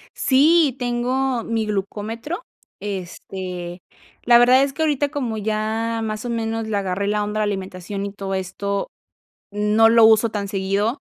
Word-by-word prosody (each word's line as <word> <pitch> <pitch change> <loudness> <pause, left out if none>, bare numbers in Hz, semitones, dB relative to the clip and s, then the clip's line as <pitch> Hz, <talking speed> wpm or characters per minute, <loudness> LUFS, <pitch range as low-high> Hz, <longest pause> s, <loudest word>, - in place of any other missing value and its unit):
Sí. 290 +1 +4
Tengo 245 0 0
mi 225 -1 -1
glucómetro, 220 - -4 0.4
este, 185 -2 -6 0.4
la 240 0 +7
verdad 250 +2 +6
es 275 0 -2
que 320 - -5
ahorita 290 -2 +1
como 255 -7 -3
ya 220 +2 -1
más 215 +1 -4
o - - -3
menos 225 -1 -2
le 215 -2 -1
agarré 195 0 -2
la 210 0 +1
onda 210 +1 -3
a - - +1
la - - +2
alimentación 195 +1 -5
y 200 - -6
todo 195 -1 -5
esto, 195 +1 -3 0.6
no 210 +2 +4
lo 230 -1 +7
uso 220 +1 +5
tan 205 -2 -3
seguido, 200 - -1
215 Hz, 160 wpm, -21 LUFS, 200-240 Hz, 0.6 s, la